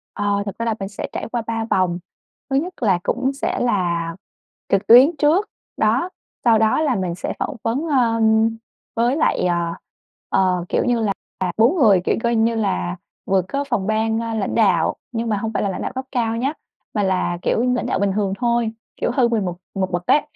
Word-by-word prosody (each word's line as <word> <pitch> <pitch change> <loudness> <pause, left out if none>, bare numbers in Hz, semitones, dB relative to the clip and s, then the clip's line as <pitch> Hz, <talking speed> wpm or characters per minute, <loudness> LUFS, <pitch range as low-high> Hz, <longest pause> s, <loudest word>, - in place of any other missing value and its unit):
Ờ, 205 0 0
thực 200 - -6
ra 230 - -2
là 225 -2 0
mình 195 0 -4
sẽ 205 - -5
trải - - -4
qua 240 -2 -1
3 225 -1 -2
vòng, 180 -2 +1 0.5
thứ 270 - 0
nhất 350 +7 0
là 190 -5 +3
cũng 265 +2 0
sẽ 275 - -2
là 170 -7 0 0.5
trực 195 +1 +1
tuyến 260 +8 +8
trước, 335 +8 +2 0.3
đó, 235 +11 +2 0.4
sau 225 -2 +5
đó 220 +7 +3
là 275 -6 +1
mình 180 -3 -2
sẽ - - -4
phỏng 290 - -2
vấn, 260 +8 -1
ơm, 225 -4 +3 0.5
với 240 +4 +2
lại, 305 - +1
à, 170 -1 -1 0.5
ờ, 180 -2 +1
kiểu - - +1
như 240 -2 +2
là 205 -3 0 0.4
4 240 +11 +4
người. 210 - +5
Kiểu, - - +2
coi 235 0 +2
như 225 +1 +2
là, 90 - -1 0.3
vừa 190 -1 +2
có 280 +10 -3
phòng 205 -8 -2
ban, 220 +1 +1
a, 230 -1 -3
lãnh 200 -3 -2
đạo, 190 -8 +3 0.2
nhưng 230 -1 -2
mà 210 - +1
hông 220 +2 -3
phải - - 0
là 200 - 0
lãnh - - -4
đạo - - -3
cấp 260 0 -4
cao 230 -3 0
nhá, 270 +5 0 0.4
mà 210 - 0
là, 185 -2 0
kiểu, 230 - +1
lãnh - - -2
đạo 190 - -1
bình 200 -1 +1
thường 200 -2 0
thôi, 235 -2 +1 0.3
kiểu, - - +1
hơn 245 -3 +2
mình 215 -4 +1
một 175 -1 -3 0.2
một 190 -1 -1
bậc 175 0 -2
đấy, 295 - +4
220 Hz, 215 wpm, -21 LUFS, 190-240 Hz, 0.5 s, tuyến